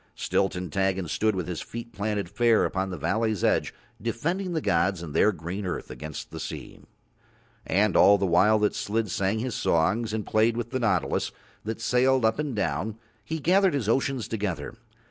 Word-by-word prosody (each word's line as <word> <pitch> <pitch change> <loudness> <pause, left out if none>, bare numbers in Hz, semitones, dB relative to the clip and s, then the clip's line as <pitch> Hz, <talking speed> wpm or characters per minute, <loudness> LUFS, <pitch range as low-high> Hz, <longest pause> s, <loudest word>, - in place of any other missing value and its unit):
Still 95 - +1
Tintaggon 95 +1 -1
stood 110 +6 +1
with 90 -3 -3
his 90 -3 -4
feet 115 0 -8
planted 105 -2 -2
fair 115 +4 +3
upon 95 -1 -1
the 90 - -5
valley's 110 +5 0
edge - - +2 0.3
defending 170 - -2
the 160 - +1
gods 85 - +1
and 75 -4 -7
Their 100 +7 +4
green 90 +3 -5
earth 90 -2 -4
against 75 -1 -7
the - - -7
sea. - - -7 0.9
And 100 +2 +2
all 100 0 +7
the 100 - 0
while 95 +5 +4
that 105 -1 +1
Slid 110 -1 -2
sang 95 +4 0
his 120 +2 -2
songs 105 +9 +1
and 110 -1 -3
played 115 +2 +2
with 120 0 -4
the 130 - -1
nautilus 105 -7 0 0.3
that 110 +1 -3
sailed 125 +1 +3
up 110 +5 +2
and 150 -5 -2
down 95 +3 -2 0.3
he 160 +10 -3
gathered 185 +3 +3
his 125 -7 -1
oceans 130 +1 0
together. 105 -5 -3
105 Hz, 185 wpm, -26 LUFS, 95-115 Hz, 0.9 s, all